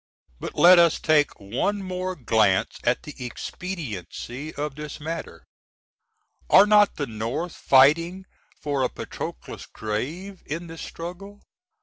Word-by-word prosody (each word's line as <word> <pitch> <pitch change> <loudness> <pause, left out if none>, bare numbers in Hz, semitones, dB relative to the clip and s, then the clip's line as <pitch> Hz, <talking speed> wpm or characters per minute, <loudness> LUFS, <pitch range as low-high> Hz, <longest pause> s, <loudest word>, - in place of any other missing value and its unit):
But - - -6
let 175 +1 +8
us 170 -2 +4
take 150 -2 +2
one 130 - -2
more 185 0 -3
glance 110 - +1
at 120 +1 +1
the 150 - -8
expediency 135 - -6
of 145 0 -3
this 150 +1 -8
matter. 155 - -6 1.1
Are 195 - +8
not 210 -1 +5
the 145 - -2
North 115 +9 -4
fighting 165 +8 +4 0.3
for 145 -2 -1
a 125 - +1
Patroclus' - - -7
grave 155 - -5
in 165 +4 -4
this 165 -1 -9
struggle? 190 +5 -8
155 Hz, 125 wpm, -24 LUFS, 125-180 Hz, 1.1 s, let